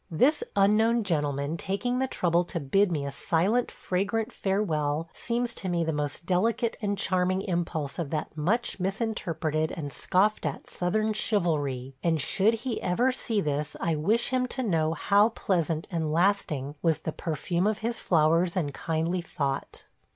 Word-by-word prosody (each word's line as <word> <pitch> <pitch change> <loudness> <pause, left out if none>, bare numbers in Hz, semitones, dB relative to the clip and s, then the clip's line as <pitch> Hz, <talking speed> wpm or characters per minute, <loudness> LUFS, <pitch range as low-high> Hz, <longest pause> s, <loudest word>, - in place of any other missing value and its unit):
This 260 - +3
unknown 220 +4 +4
gentleman 145 -3 -1
taking 245 +8 -1
the 265 - +1
trouble 175 -7 +1
to 170 - -3
bid 180 +7 +2
me 145 -4 -1
a 140 - -3
silent, 185 - +1
fragrant 205 +5 -2
farewell 165 -6 0
seems 240 0 -2
to 190 - -4
me 170 -1 +1
the 160 -1 -1
most 150 +2 -3
delicate 225 +6 +1
and 205 -1 -1
charming 185 0 +1
impulse 170 -5 -2
of 165 -5 -2
that 155 0 -3
much 195 +10 0
misinterpreted 170 -6 -1
and 145 -4 -5
scoffed 200 +3 +1
at 150 -4 -4
Southern 215 +5 0
chivalry, 145 - 0
and 165 -2 +2
should 200 +10 +2
he 235 0 -4
ever 240 +9 +2
see 225 -4 -1
this 150 -1 -2
I 165 - 0
wish 210 +10 +1
him 255 -1 +1
to 260 +1 -3
know 165 -7 +1
how 205 +4 +4
pleasant 170 -7 -1
and 160 -3 -1
lasting 155 -5 +1
was 165 -2 +2
the 160 - -4
perfume 170 +4 -1
of 215 -1 +1
his 235 0 -1
flowers 165 +2 +2
and 145 -6 -1
kindly 165 +4 -1
thought. 140 -5 -3
175 Hz, 165 wpm, -27 LUFS, 155-210 Hz, -, unknown